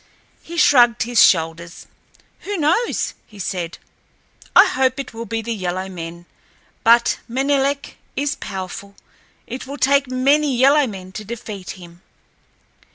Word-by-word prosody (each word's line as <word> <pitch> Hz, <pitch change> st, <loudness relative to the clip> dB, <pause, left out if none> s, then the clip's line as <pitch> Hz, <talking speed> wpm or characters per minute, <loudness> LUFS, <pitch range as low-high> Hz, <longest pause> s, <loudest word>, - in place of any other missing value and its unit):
He 340 Hz, +1 st, -9 dB
shrugged 240 Hz, -7 st, +5 dB
his 240 Hz, -1 st, +4 dB
shoulders. 165 Hz, 0 st, +1 dB, 0.5 s
"Who 410 Hz, 0 st, -4 dB
knows?" 340 Hz, +10 st, 0 dB
he 210 Hz, -, -16 dB
said. 180 Hz, -3 st, -4 dB, 0.8 s
"I -, -, +9 dB
hope 260 Hz, 0 st, 0 dB
it 270 Hz, -3 st, -6 dB
will 230 Hz, +1 st, -7 dB
be 225 Hz, +2 st, -3 dB
the 230 Hz, +1 st, -3 dB
yellow 185 Hz, -2 st, -3 dB
men, 170 Hz, -1 st, -8 dB, 0.6 s
but 235 Hz, +1 st, +4 dB
Menelek 275 Hz, +2 st, 0 dB, 0.2 s
is 285 Hz, 0 st, 0 dB
powerful—it 200 Hz, +6 st, -9 dB
will 280 Hz, +1 st, -6 dB
take 275 Hz, 0 st, +3 dB
many 275 Hz, +2 st, +2 dB
yellow 275 Hz, +2 st, +5 dB
men 190 Hz, -4 st, -8 dB
to 215 Hz, -, -7 dB
defeat 210 Hz, -4 st, -7 dB
him." 175 Hz, -1 st, -14 dB
235 Hz, 130 wpm, -20 LUFS, 185-275 Hz, 0.8 s, I